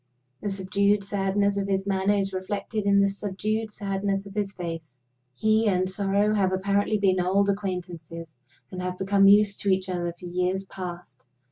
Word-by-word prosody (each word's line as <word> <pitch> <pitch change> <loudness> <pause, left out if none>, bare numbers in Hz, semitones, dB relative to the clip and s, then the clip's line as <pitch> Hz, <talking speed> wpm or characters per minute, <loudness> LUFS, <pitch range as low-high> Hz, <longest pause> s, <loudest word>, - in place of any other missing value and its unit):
The 205 - -2
subdued 200 +1 +1
sadness 200 0 0
of 200 0 -1
his 195 -1 0
manner 195 +1 +1
is 195 -1 -1
reflected 200 +2 -3
in 200 0 +5
the 200 - +4
subdued 210 +2 -2
sadness 195 -1 -2
of 200 - -10
his 200 -1 -2
face. 165 -8 -7 0.4
He 215 - +2
and 185 -2 +2
sorrow 200 +2 +1
have 195 -3 +2
apparently 200 +3 +1
been 190 -2 +2
old 195 +3 +2
acquaintances, 175 -5 -4 0.4
and 185 - -5
have 180 0 -3
become 195 +1 +4
used 205 0 +5
to 200 - 0
each 190 0 +1
other 175 -1 -2
for - - -10
years 180 +2 -1
past. 175 -8 -8
195 Hz, 170 wpm, -26 LUFS, 185-200 Hz, 0.4 s, in